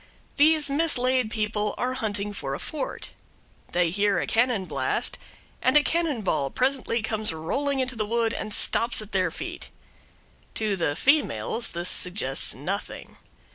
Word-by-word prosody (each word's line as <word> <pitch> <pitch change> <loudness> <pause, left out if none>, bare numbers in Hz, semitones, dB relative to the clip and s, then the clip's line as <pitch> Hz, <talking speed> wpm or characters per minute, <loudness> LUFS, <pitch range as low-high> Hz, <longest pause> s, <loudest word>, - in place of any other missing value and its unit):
These 310 +1 +5
mislaid 260 -5 +2
people 210 -1 -1
are 255 +1 -1
hunting 205 -4 -3
for 135 -8 -4
a - - -6
fort. 305 - -5 0.6
They 175 -2 +2
hear 200 0 +2
a - - -1
cannonblast, 215 - 0 0.5
and 255 +3 +5
a 295 - +5
cannon 320 -8 0
ball 140 -7 0
presently 255 - 0
comes 220 -2 -1
rolling 270 - -2
into 260 -1 -2
the 215 -2 -2
wood 230 0 +1
and 215 - -4
stops 230 +2 +2
at 210 - -14
their 185 -2 +1
feet. 350 - -7 0.9
To 215 -2 0
the 165 -5 -1
females 275 - +1
this 175 +1 0
suggests 180 -7 +2
nothing. 185 +10 -5
220 Hz, 145 wpm, -26 LUFS, 195-260 Hz, 0.9 s, These